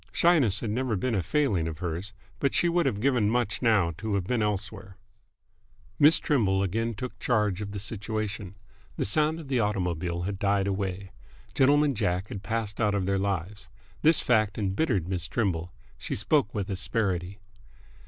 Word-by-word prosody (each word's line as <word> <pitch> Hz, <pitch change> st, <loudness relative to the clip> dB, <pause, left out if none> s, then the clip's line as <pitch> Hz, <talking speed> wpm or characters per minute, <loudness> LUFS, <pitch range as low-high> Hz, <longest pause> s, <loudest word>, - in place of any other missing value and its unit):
Shyness 140 Hz, -, +3 dB
had 110 Hz, -, -2 dB
never 125 Hz, 0 st, -1 dB
been 120 Hz, +5 st, -1 dB
a 100 Hz, -, +1 dB
failing 100 Hz, -, 0 dB
of 80 Hz, -2 st, -5 dB
hers, 90 Hz, +3 st, -4 dB, 0.3 s
but 140 Hz, -, 0 dB
she 175 Hz, -, +3 dB
would 170 Hz, 0 st, +2 dB
have 100 Hz, -, -1 dB
given 120 Hz, -5 st, +2 dB
much 120 Hz, +1 st, -1 dB
now 105 Hz, -8 st, +3 dB
to 110 Hz, -2 st, -2 dB
have 100 Hz, -, 0 dB
been 120 Hz, +5 st, -1 dB
elsewhere. 105 Hz, -1 st, -3 dB, 1.0 s
Miss 150 Hz, +3 st, +7 dB
Trimble 100 Hz, -, +1 dB
again 115 Hz, +4 st, -1 dB
took 125 Hz, +5 st, -7 dB
charge 105 Hz, -5 st, +1 dB
of 100 Hz, -1 st, -5 dB
the 105 Hz, -, -5 dB
situation. 105 Hz, -2 st, -4 dB, 0.4 s
The -, -, 0 dB
sound 155 Hz, +9 st, +2 dB
of 155 Hz, -, -9 dB
the 130 Hz, -2 st, 0 dB
automobile 90 Hz, -5 st, -1 dB
had 95 Hz, +1 st, -4 dB
died 100 Hz, -1 st, +1 dB
away. 95 Hz, -1 st, -3 dB, 0.4 s
Gentleman 145 Hz, +2 st, +4 dB
Jack 100 Hz, -4 st, -1 dB
had 100 Hz, -, -6 dB
passed 110 Hz, -1 st, -3 dB
out 105 Hz, -2 st, +2 dB
of 100 Hz, -2 st, 0 dB
their 100 Hz, 0 st, +1 dB
lives. 100 Hz, 0 st, -3 dB, 0.3 s
This 160 Hz, 0 st, +5 dB
fact 110 Hz, -4 st, +2 dB
embittered 100 Hz, -, 0 dB
Miss 90 Hz, -2 st, -3 dB
Trimble. 90 Hz, -5 st, -1 dB, 0.3 s
She -, -, -3 dB
spoke 110 Hz, +3 st, +1 dB
with 100 Hz, -1 st, -3 dB
asperity. 95 Hz, -1 st, -1 dB
105 Hz, 175 wpm, -27 LUFS, 95-120 Hz, 1.0 s, Miss